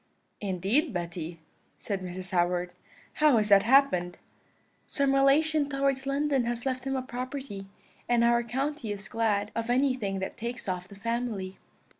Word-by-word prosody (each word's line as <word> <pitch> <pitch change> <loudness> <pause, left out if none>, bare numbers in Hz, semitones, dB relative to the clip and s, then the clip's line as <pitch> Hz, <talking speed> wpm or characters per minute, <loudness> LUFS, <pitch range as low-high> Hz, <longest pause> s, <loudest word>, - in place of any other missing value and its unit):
"'Indeed, 205 - 0
Betty,' 170 -1 -4 0.4
said 200 -3 -3
Mrs. 185 0 -6
Howard: 175 0 +1 0.4
'how 300 -5 +4
has 210 -1 +1
that 200 -1 +7
happened?' 215 -9 +3 0.7
"'Some 280 -1 +1
relation 285 +2 +3
towards 275 -1 0
London 275 -2 +1
has 240 +1 -3
left 260 -1 -2
him 270 0 -1
a 260 - -1
property, 255 -5 -6 0.4
and 240 -1 +4
our 235 0 +4
county 265 +1 -3
is 200 -1 -5
glad 210 -2 0
of 230 0 -3
anything 250 -6 +1
that 190 0 -4
takes 235 0 -5
off 180 -1 -3
the 200 - -13
family.' 215 -3 -3
235 Hz, 150 wpm, -28 LUFS, 195-270 Hz, 0.7 s, that